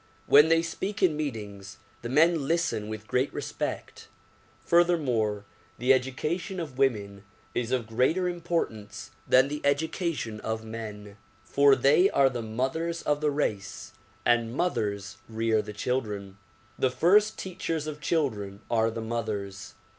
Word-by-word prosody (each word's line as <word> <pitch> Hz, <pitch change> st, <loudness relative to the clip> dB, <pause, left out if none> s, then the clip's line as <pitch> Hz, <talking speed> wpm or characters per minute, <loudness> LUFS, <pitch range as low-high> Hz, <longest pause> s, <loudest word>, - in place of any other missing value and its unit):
When 150 Hz, +3 st, +7 dB
they 165 Hz, 0 st, +4 dB
speak 190 Hz, +5 st, -4 dB
in 170 Hz, -5 st, +4 dB
meetings, 105 Hz, -9 st, -5 dB, 0.2 s
the 120 Hz, -, -5 dB
men 155 Hz, +1 st, +3 dB
listen 165 Hz, -10 st, 0 dB
with 110 Hz, 0 st, -6 dB
great 125 Hz, +4 st, 0 dB
respect. -, -, -5 dB, 0.6 s
Furthermore, 130 Hz, -13 st, +2 dB, 0.3 s
the 125 Hz, +3 st, +4 dB
education 150 Hz, +8 st, -2 dB
of 145 Hz, -6 st, -6 dB
women 100 Hz, -7 st, 0 dB, 0.3 s
is 120 Hz, 0 st, -2 dB
of 125 Hz, -3 st, 0 dB
greater 130 Hz, +11 st, +1 dB
importance 170 Hz, -12 st, -3 dB, 0.2 s
than 130 Hz, +1 st, +5 dB
the 150 Hz, +1 st, -5 dB
education 145 Hz, -, -1 dB
of 110 Hz, 0 st, -4 dB
men, 105 Hz, -2 st, -8 dB, 0.3 s
for 140 Hz, +2 st, +5 dB
they 140 Hz, +9 st, +4 dB
are 135 Hz, -1 st, +3 dB
the 120 Hz, -1 st, -4 dB
mothers 135 Hz, +10 st, -2 dB
of 150 Hz, 0 st, 0 dB
the 150 Hz, -, +2 dB
race 105 Hz, -9 st, -3 dB, 0.3 s
and 120 Hz, 0 st, +2 dB
mothers 105 Hz, -, -2 dB
rear 110 Hz, -1 st, +1 dB
the 105 Hz, -, -8 dB
children. 105 Hz, -3 st, -3 dB, 0.4 s
The 130 Hz, -, +3 dB
first 205 Hz, +10 st, +3 dB
teachers 170 Hz, -4 st, -3 dB
of 150 Hz, -1 st, -6 dB
children 110 Hz, -, -1 dB
are 115 Hz, -1 st, +3 dB
the 115 Hz, 0 st, -5 dB
mothers. 105 Hz, -4 st, -4 dB
125 Hz, 140 wpm, -27 LUFS, 110-160 Hz, 0.6 s, When